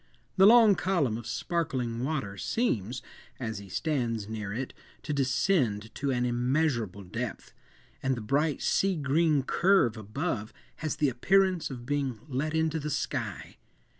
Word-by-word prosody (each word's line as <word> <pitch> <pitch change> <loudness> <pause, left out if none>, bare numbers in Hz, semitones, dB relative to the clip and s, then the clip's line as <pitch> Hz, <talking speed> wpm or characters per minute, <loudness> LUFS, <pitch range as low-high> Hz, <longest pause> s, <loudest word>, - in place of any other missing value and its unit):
The 190 0 +7
long 225 -2 +8
column 170 - +1
of 115 0 -6
sparkling 125 -8 -2
water 135 -9 -2
seems, 120 - -1 0.4
as 110 -5 -3
he 100 -1 -11
stands 115 - -1
near 105 -2 -5
it, 125 +5 -4 0.3
to 150 - -2
descend 130 - +1
to 140 - -2
an 125 -2 +1
immeasurable 120 - 0
depth, 115 +5 -5 0.5
and 130 0 +1
the - - -4
bright 145 +7 0
sea 195 -1 +2
green 150 0 +2
curve 170 - +3
above 110 - -3 0.2
has 155 -2 -2
the 145 - +2
appearance 185 +7 +2
of 120 -3 -7
being 135 -4 -1
let 150 +3 -2
into 160 0 +1
the 150 0 -4
sky. 145 - -3
135 Hz, 145 wpm, -29 LUFS, 115-160 Hz, 0.5 s, long